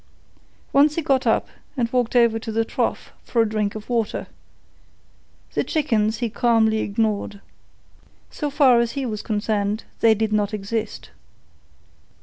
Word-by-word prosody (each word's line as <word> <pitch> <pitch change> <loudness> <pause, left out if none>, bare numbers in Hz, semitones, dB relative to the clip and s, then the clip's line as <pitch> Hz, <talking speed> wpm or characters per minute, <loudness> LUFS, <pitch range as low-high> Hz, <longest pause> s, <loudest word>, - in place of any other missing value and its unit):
Once 290 +2 +5
he 330 - 0
got 270 -3 +1
up - - +2 0.3
and 235 -1 -1
walked 245 -1 0
over 235 -2 +4
to 225 0 -6
the 225 +1 0
trough - - -2
for 235 - -2
a 225 - +4
drink 210 -1 -2
of 215 0 -8
water. 230 -3 -1 1.3
The - - +1
chickens 225 -8 0
he 240 +1 -1
calmly 225 -2 +2
ignored. 210 -1 -1 0.9
So 295 - -3
far 275 -4 +5
as 235 -1 0
he 275 -2 -3
was 215 -3 -4
concerned 210 0 -1 0.2
they 225 -1 +5
did 215 0 -1
not 210 0 0
exist. 210 +2 -4
225 Hz, 145 wpm, -22 LUFS, 215-245 Hz, 1.3 s, Once